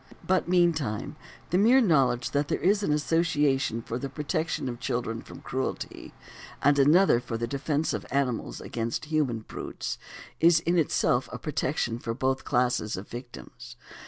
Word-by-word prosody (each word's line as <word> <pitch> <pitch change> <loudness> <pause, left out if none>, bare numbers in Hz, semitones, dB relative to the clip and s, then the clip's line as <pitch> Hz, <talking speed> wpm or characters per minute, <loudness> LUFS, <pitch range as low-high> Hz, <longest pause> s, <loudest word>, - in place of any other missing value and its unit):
But 185 -2 +1
meantime 160 - +1 0.4
the 180 - +3
mere 240 +6 +6
knowledge 135 - +2
that 145 0 0
there - - 0
is 200 +3 +2
an 200 - 0
association 145 -6 +1
for 115 +2 -4
the 140 - -4
protection 150 +2 -2
of 120 -1 -5
children 115 -1 -2
from - - -12
cruelty, 130 +1 -4 0.5
and 145 0 +4
another 150 0 +5
for 120 -2 -5
the 115 - -2
defence 140 +5 -1
of - - -4
animals 125 - -1
against 115 +5 -3
human 150 -7 0
brutes, - - -6 0.4
is 165 0 +6
in 170 +1 +2
itself 130 -5 +1
a - - -5
protection 130 -5 -2
for 115 -1 -4
both 130 +1 -1
classes 125 -5 +1
of 95 - -8
victims. 120 0 -10
140 Hz, 160 wpm, -27 LUFS, 120-160 Hz, 0.5 s, mere